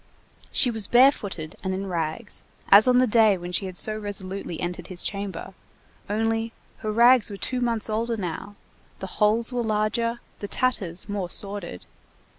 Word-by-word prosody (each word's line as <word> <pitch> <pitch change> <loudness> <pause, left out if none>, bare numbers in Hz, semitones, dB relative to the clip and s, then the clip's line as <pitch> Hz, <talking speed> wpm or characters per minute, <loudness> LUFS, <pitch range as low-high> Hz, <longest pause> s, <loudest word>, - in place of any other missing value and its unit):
She 250 - +5
was 220 -3 0
barefooted 205 - +2
and 190 -1 -1
in 195 +1 -4
rags, 175 +4 -4 0.3
as 205 +4 +8
on 250 0 +5
the 255 - +5
day 220 -4 +4
when 175 0 -7
she 190 +2 -1
had 185 -1 -8
so 215 - 0
resolutely 195 -4 -3
entered 175 0 -4
his 180 -2 -5
chamber, 200 -1 -5 0.6
only 225 +2 -1 0.2
her 215 - -4
rags 235 +1 +5
were 200 - -7
two 255 +5 -1
months 230 -3 0
older 225 +1 -1
now, 195 +2 -5 0.4
the - - -6 0.2
holes 225 +4 +3
were 245 - 0
larger, 230 +2 -1 0.2
the 205 - -5
tatters 195 -9 -1
more 200 -4 -3
sordid. 195 - -5
210 Hz, 165 wpm, -25 LUFS, 190-230 Hz, 0.6 s, as